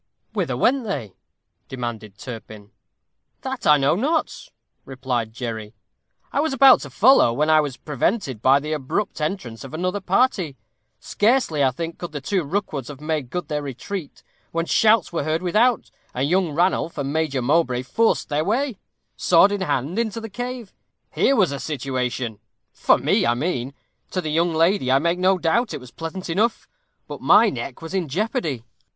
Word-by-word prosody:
"Whither - - -1
went 270 0 +2
they?" 130 - -4 0.5
demanded 115 -5 -6
Turpin. 110 -5 -9 0.7
"That 265 -1 -4
I 150 0 +7
know 140 0 +2
not," 300 - -1 0.3
replied 125 -4 -3
Jerry. 110 -2 -6 0.6
"I - - +1
was 310 -1 0
about 270 0 +7
to - - -8
follow, 240 - +5
when 150 +6 +1
I 155 0 +6
was 145 -4 -4
prevented 145 - -2
by 135 +3 +5
the 150 +2 -4
abrupt 155 +6 -3
entrance 150 - -4
of 135 +3 -8
another 185 +4 -1
party. 190 - +1 0.4
Scarcely, 210 - +1
I 135 - +4
think, 165 +6 -6
could 175 -3 -6
the 145 - -3
two 180 +6 -1
Rookwoods 150 -5 -3
have 145 -2 -9
made 150 -4 -3
good 180 +6 -4
their 150 -2 -2
retreat, 145 +5 -7 0.3
when 165 0 -1
shouts 215 -1 +3
were 165 - -1
heard 155 +3 -1
without, 220 +7 +2 0.2
and 130 +3 0
young 180 +1 +2
Ranulph 170 +1 0
and 140 0 -2
Major 155 -5 0
Mowbray 130 -3 +1
forced 225 - +1
their 150 +1 0
way, 235 - -1 0.4
sword 180 +3 +5
in 205 -1 -2
hand, 170 - -1
into 230 -1 -2
the 225 -1 -8
cave. 245 0 -6 0.4
Here 275 - +2
was 190 - +3
a 140 - -4
situation 125 -6 -3 0.3
for - - +3
me, - - +1
I 120 - +2
mean 135 -2 -2 0.3
to 185 - -2
the 155 -4 -3
young 170 +2 +2
lady, 165 -3 +2
I 135 - +5
make 170 +5 0
no 185 +1 +3
doubt, 195 +8 0
it - - -5
was 125 -2 -13
pleasant 165 +3 -6
enough. 210 +7 0 0.4
But - - -8
my 220 +1 +5
neck 130 +3 -6
was 165 - -7
in 185 -4 -1
jeopardy. 155 - -2
160 Hz, 175 wpm, -22 LUFS, 135-200 Hz, 0.7 s, I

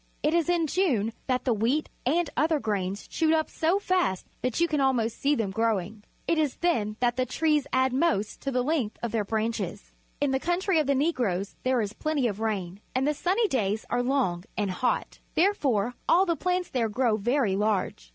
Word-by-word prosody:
It 300 - +2
is 340 0 +2
in 345 -2 +2
June 270 - +1
that 255 -1 0
the 250 - +3
wheat 235 +8 +1 0.2
and 335 +5 +2
other 310 +3 +2
grains 200 -4 -2
shoot 320 -1 +2
up 315 -1 -1
so 330 +4 +1
fast 365 - 0 0.2
that 250 -2 -1
you 340 - +4
can 300 -3 0
almost 235 -4 +1
see 290 +1 +2
them 220 -7 -1
growing. 215 -1 -1 0.2
It 335 - +2
is 300 -4 +1
then 220 -12 0
that 245 0 +2
the 255 - +1
trees 300 +1 +1
add 260 0 +2
most 260 -8 0
to 275 - -2
the 250 -2 0
length 265 -7 -1
of 235 - -1
their 225 -2 0
branches. 215 -2 -3 0.3
In 285 -2 +1
the 265 - +1
country 350 +2 +1
of 305 - 0
the 280 - +3
Negroes 240 - 0
there 255 -2 +1
is 210 -1 -3
plenty 305 -1 -1
of 205 -2 -4
rain, 200 -4 -3
and 265 +2 +1
the 300 - +2
sunny 380 +9 +1
days 215 - -1
are 245 - +2
long 245 -10 0
and 205 -3 0
hot. 245 +7 -1 0.2
Therefore 270 - +2 0.2
all 365 +3 +5
the 340 -3 +1
plants 360 +1 -1
there 235 -4 0
grow 235 0 +1
very 230 -1 +1
large. 200 - -1
255 Hz, 205 wpm, -27 LUFS, 215-315 Hz, 0.3 s, all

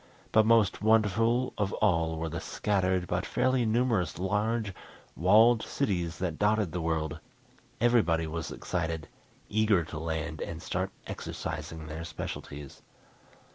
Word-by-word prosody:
But 110 0 +5
most 115 -4 +4
wonderful 115 +3 +3
of 100 -1 0
all 85 -5 +1
were 80 +1 -2
the 80 +1 -4
scattered, 95 -3 0
but - - -1
fairly 130 -2 +1
numerous 115 -6 +1
large, 105 +3 0 0.4
walled 110 +6 +5
cities 90 -10 -1
that 90 -4 -3
dotted 105 -3 +2
the 90 - -3
world. 80 -1 -1 0.6
Everybody 105 -9 +3
was 80 +1 -4
excited, 80 -3 -3 0.4
eager 105 -4 +3
to 75 -1 -7
land 80 -1 -3
and 80 - -5
start 95 +1 -2 0.2
exercising 75 +1 -5
their 80 +2 -6
specialties. 75 -4 -7
90 Hz, 130 wpm, -29 LUFS, 80-110 Hz, 0.6 s, But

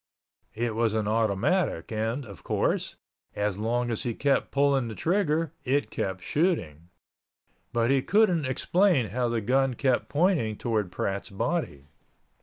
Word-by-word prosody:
It 115 0 -1
was 110 -1 +1
an 110 -2 0
automatic 110 - 0
and, 115 +5 -2
of 100 -6 -12
course, - - -1 0.4
as 105 -1 -1
long 120 +2 0
as 115 - -2
he 120 -4 -2
kept 140 -1 +1
pulling 140 -3 +2
the 110 - -6
trigger 165 - 0
it 130 -4 0
kept 95 -2 -3
shooting, 90 - -1 0.8
but 120 +1 +1
he 135 -1 +3
couldn't 180 -1 +3
explain 160 - +2
how 120 +4 -1
the 115 -1 -1
gun 130 +3 +1
kept 130 -2 0
pointing 150 - +1
towards 110 -5 -1
Pratt's 100 +4 -3
body. 115 - -2
120 Hz, 145 wpm, -27 LUFS, 110-145 Hz, 0.8 s, he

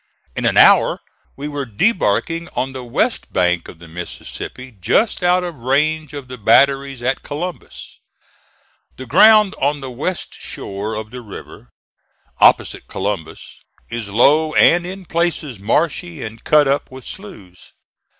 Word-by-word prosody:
In - - -2
an - - +1
hour - - +6 0.4
we 145 +2 -6
were 145 -2 -4
debarking 165 - 0
on 130 +1 -2
the 130 -1 -7
west 145 - -1
bank 90 -2 +1
of - - -12
the 85 0 -14
Mississippi, 90 +9 -8
just 215 - +1
out 180 0 +3
of 175 -1 -4
range 150 +4 0
of 140 -3 -7
the 125 -1 -9
batteries 135 +3 +3
at 130 +2 0
Columbus. 170 +4 -7 1.0
The 130 - -8
ground 215 - +6
on 145 +2 +1
the 135 -2 -7
west 160 +9 -4
shore 100 +3 -5
of 110 0 -6
the 125 0 -8
river, 100 - -11 0.7
opposite - - +3
Columbus, 95 -6 -5 0.3
is 115 -3 -5
low 150 +9 +3
and 175 +1 +5
in 190 0 -8
places 165 - -2
marshy 155 - -1
and 110 +1 -9
cut 150 -2 +4
up 140 +2 0
with 130 -1 -12
sloughs. 100 - -11
135 Hz, 145 wpm, -19 LUFS, 110-165 Hz, 1.0 s, hour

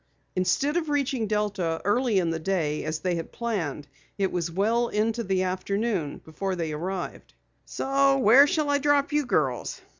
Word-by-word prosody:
Instead 275 - +1
of 320 -3 -1
reaching 275 -5 0
Delta 205 -6 -1
early 230 +1 +2
in 170 -3 +1
the 165 - -2
day 160 -4 -1
as 155 0 -2
they 180 +3 -1
had 165 -1 -4
planned, 170 - -3 0.3
it 195 -2 0
was 175 -2 -2
well 220 +7 +1
into 225 +2 0
the 190 -3 0
afternoon 190 -2 -2
before 185 +5 -3
they 165 -3 -3
arrived. 175 +4 -5 0.4
"Where 275 -1 +5
shall 300 -1 0
I 285 - +2
drop 290 +1 +2
you 295 -3 +1
girls?" 135 - 0
200 Hz, 160 wpm, -26 LUFS, 170-255 Hz, 0.4 s, Where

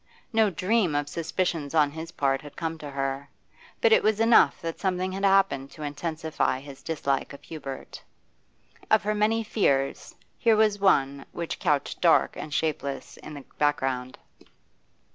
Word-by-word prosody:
No 220 -1 +4
dream 195 -3 +1
of 145 0 0
suspicions 165 -2 -2
on 150 -2 +4
his 160 +2 -7
part 135 -1 0
had 145 -1 -12
come 165 -1 -4
to 150 - -7
her, 135 0 -3 0.5
but 470 -2 +5
it - - +6
was 215 0 +1
enough 225 +1 +5
that 165 -1 -5
something 185 -1 -1
had 195 +1 -5
happened 195 -9 +3
to 155 - -9
intensify 155 -1 -2
his 140 0 -12
dislike 140 -4 -2
of 140 - -12
Hubert. 140 -4 -8 0.9
Of 215 - +4
her 210 +1 0
many 215 +2 +1
fears, 140 -11 0 0.2
here 230 -2 +4
was 215 -1 +3
one 140 -8 +2
which 170 -1 -4
couched 150 -6 0
dark - - +4
and 155 - -7
shapeless 140 -2 -2
in 150 - -10
the 140 - -10
background. 130 -4 0
160 Hz, 160 wpm, -26 LUFS, 140-195 Hz, 0.9 s, it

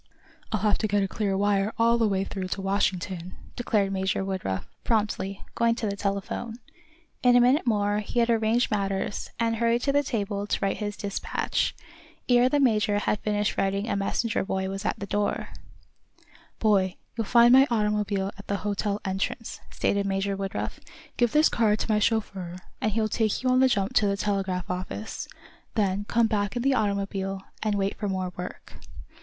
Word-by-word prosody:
"I'll 215 - 0
have 210 -1 +2
to 215 - 0
get 205 -1 +2
a - - 0
clear 195 -1 -1
wire 205 +1 +1
all 235 0 +4
the 225 - +3
way 195 -2 +1
through 190 -1 -4
to 195 - -3
Washington," 185 -2 -1 0.2
declared 210 -5 +1
Major 190 0 0
Woodruff, 185 - -3 0.2
promptly, 205 -3 -1
going 230 0 +2
to 230 - -3
the 200 - -2
telephone. 200 +3 -3 0.7
In 245 -1 +5
a - - +7
minute 255 +3 +3
more 205 -2 +2
he 215 +3 -2
had 235 - +3
arranged 225 +2 +2
matters, 195 -1 -1
and 230 -1 +1
hurried 235 +1 +2
to 280 - +2
the 285 +1 +3
table 205 -6 -2
to - - 0
write 195 -1 0
his 205 -1 -4
despatch. 200 -2 -1 0.5
Ere 245 0 +5
the 290 - +2
major 215 -6 +3
had 205 0 0
finished 210 0 -1
writing 195 +2 0
a - - 0
messenger 215 +3 0
boy 190 -1 -2
was 195 +2 -5
at - - 0
the 200 - -5
door. 205 0 -1 1.1
"Boy, 195 -4 +2 0.2
you'll 230 - -1
find 235 +2 +6
my 265 +2 +7
automobile 210 -3 0
at 200 - -11
the 200 - 0
hotel 205 0 -1
entrance," 195 +4 -3
stated 200 0 0
Major 195 0 0
Woodruff. 195 0 -4 0.4
"Give 240 -2 +2
this 305 +4 +5
card 215 -2 +2
to 220 - -2
my 210 - +3
chauffeur, 195 -5 -1 0.3
and 215 - +1
he'll 220 +1 +1
take 215 +2 0
you 255 - +2
on 255 - +4
the 265 - +6
jump 200 -4 0
to 210 - +4
the 200 0 0
telegraph 195 -3 -1
office. 185 +4 -5 0.5
Then 200 -2 +1
come 235 +2 +2
back 205 -1 0
in 240 - -1
the 275 0 +3
automobile, 195 -3 -1 0.2
and 215 -2 0
wait 195 0 0
for 205 - -1
more 185 -1 -2
work." 180 0 -8
205 Hz, 185 wpm, -26 LUFS, 195-225 Hz, 1.1 s, a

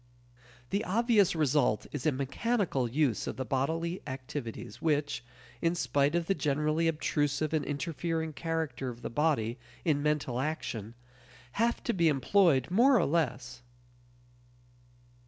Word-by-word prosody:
The 200 +2 0
obvious 215 -2 +3
result 145 -7 +2
is 145 0 -2
a - - +4
mechanical 140 - 0
use 135 -3 +1
of - - -4
the 130 - -3
bodily 165 - -1
activities 125 -3 -6
which 145 -4 0 0.4
(in 170 0 +2
spite 140 +1 +1
of 170 -1 +1
the 195 - +2
generally 150 +1 +1
obtrusive 150 -1 0
and 155 -2 +1
interfering 160 +1 -2
character 155 -5 -3
of 120 0 -9
the - - -4
body 130 -5 +1 0.3
in 150 -4 +2
mental 145 -5 0
action) 120 -7 -3 0.6
have 230 - 0
to 235 - 0
be 170 -3 +3
employed 150 -1 +3
more 250 +7 +5
or 185 - +3
less. 130 -7 -1
150 Hz, 135 wpm, -30 LUFS, 130-165 Hz, 0.6 s, more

